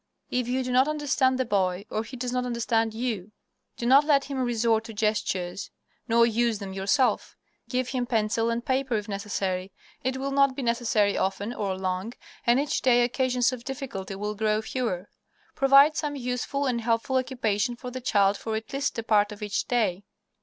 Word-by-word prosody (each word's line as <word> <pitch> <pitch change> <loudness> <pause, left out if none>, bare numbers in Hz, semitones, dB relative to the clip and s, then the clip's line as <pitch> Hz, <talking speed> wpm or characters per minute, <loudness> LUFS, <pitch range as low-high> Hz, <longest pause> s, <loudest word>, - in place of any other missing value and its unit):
If 250 -1 0
you 260 +1 0
do 250 - -3
not 255 +3 +4
understand 290 -4 +1
the 260 - 0
boy, 195 -3 0
or 215 - -1
he 255 +3 -9
does 245 0 -3
not 250 0 0
understand 230 -2 0
you, 220 -5 -3 0.5
do 235 - -4
not 270 +4 +6
let 290 -2 +3
him 275 -2 -4
resort 230 -2 +1
to 225 - -9
gestures, 200 -3 -1 0.4
nor 235 0 +5
use 235 -1 +1
them 195 -2 -7
yourself. 200 +7 +1 0.3
Give 255 0 0
him 250 -2 -2
pencil 225 0 +1
and 235 +1 -2
paper, 265 -2 0
if 210 0 -2
necessary. 195 -2 -3 0.3
It 260 0 -1
will 275 +1 -3
not 275 -1 +3
be 275 - -4
necessary 235 -4 +1
often 195 +4 -1
or 195 -5 -2
long, 185 +4 -3 0.3
and 240 +2 +5
each 290 +1 -1
day 245 -2 +4
occasions 250 0 +1
of 240 -2 -7
difficulty 240 -8 -5
will 210 +2 -3
grow 215 0 0
fewer. 220 -7 -3 0.5
Provide 275 +3 +6
some 295 -2 -2
useful 255 +2 -2
and 245 -3 0
helpful 235 +4 +1
occupation 245 -3 0
for 250 +1 -8
the 255 +1 -6
child 200 -4 +3
for 220 +1 -4
at 220 +4 -6
least 275 -1 -1
a 230 - -2
part 210 -2 +3
of 210 0 -8
each 205 -1 -2
day. 210 -6 0
235 Hz, 190 wpm, -26 LUFS, 210-255 Hz, 0.5 s, not